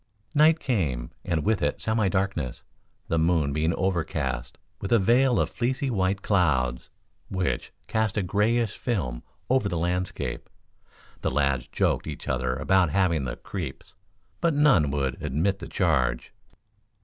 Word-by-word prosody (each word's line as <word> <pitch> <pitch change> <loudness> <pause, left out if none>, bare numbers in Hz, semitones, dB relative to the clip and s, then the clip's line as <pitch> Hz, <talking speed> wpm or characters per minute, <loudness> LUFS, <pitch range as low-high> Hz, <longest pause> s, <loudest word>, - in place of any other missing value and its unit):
Night 155 +1 +5
came, 75 - -1
and 80 -3 -1
with 105 -3 +2
it 75 -2 0
semi 110 -3 +1
darkness, 95 -9 -2 0.4
the 85 - +1
moon 80 -4 +2
being 80 +2 +1
overcast 80 -9 -2 0.2
with 100 - -5
a 120 - +6
veil 120 +5 +3
of - - +2
fleecy 130 +2 -1
white 95 -2 0
clouds, 65 - +1 0.4
which 90 -10 -2
cast 110 -2 0
a 105 - +1
grayish 105 +4 +1
film 75 - -2 0.3
over 130 -5 +2
the 85 - -2
landscape. 90 +2 -2 0.7
The - - 0
lads 65 -2 0
joked - - 0
each - - -7
other 65 -1 0
about 90 +5 +3
having 85 -5 +1
the 60 - -3
"creeps," 85 -9 -7 0.5
but 165 -3 +1
none 140 - +4
would 70 -2 -2
admit 95 +9 0
the 85 - -7
charge. - - 0
90 Hz, 145 wpm, -26 LUFS, 70-105 Hz, 0.7 s, a